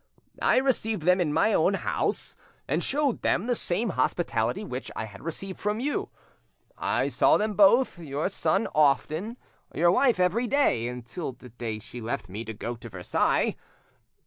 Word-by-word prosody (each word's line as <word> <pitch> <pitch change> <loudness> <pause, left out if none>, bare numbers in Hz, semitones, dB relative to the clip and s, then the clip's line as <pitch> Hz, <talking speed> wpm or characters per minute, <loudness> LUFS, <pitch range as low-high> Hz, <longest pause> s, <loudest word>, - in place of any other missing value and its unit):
I - - +4
received 225 - +1
them 180 +2 +4
in 155 -4 +1
my 215 +8 +3
own 190 +3 +3
house, - - -1 0.3
and - - 0
showed 285 -3 +1
them 185 - +1
the 245 - +1
same 220 0 -1
hospitality 130 - 0
which 130 -9 -5
I 110 - -3
had 100 -2 -12
received 185 +4 -5
from 210 +1 -1
you. 285 +4 -2 0.7
I - - 0
saw - - +4
them 215 0 -1
both, 205 +1 +4
your 150 -2 -2
son 155 -11 0
often, 155 - +1 0.4
your 170 +2 +4
wife 245 0 +3
every 195 +7 +2
day, 245 - +2
until 125 +5 -6
the 125 +1 -14
day 115 -1 -5
she 120 +3 -10
left 115 -4 -4
me 105 +5 -5
to 110 - -5
go 120 +3 -4
to 115 0 -10
Versailles. 90 -3 0
170 Hz, 170 wpm, -27 LUFS, -, 0.7 s, I